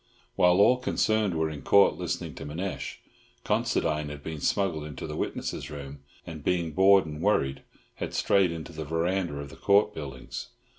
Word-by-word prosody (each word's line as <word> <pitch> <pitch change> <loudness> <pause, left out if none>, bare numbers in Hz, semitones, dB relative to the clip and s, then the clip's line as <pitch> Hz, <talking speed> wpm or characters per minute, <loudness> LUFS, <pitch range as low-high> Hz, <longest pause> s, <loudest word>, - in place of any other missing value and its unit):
While 90 -1 +4
all 115 +5 +6
concerned 110 -6 +1
were 80 -1 0
in 75 -2 -7
Court 100 +7 +5
listening - - -4
to - - -8
Manasseh, 85 +6 -4 0.5
Considine 75 -2 0
had 70 -1 -8
been 80 -2 -6
smuggled 90 -7 0
into 75 -3 -7
the - - -5
witnesses' - - -3
room 70 -1 -8 0.3
and, 80 -3 -8
being 85 -2 0
bored 95 +3 +5
and 75 0 -7
worried, 70 -10 +1 0.4
had - - -4
strayed 95 -3 +3
into 85 0 -7
the 80 0 -5
verandah 85 +1 -1
of 70 0 -7
the - - -11
Court 100 +1 +3
buildings. 70 -5 -7
80 Hz, 170 wpm, -28 LUFS, 75-95 Hz, 0.5 s, all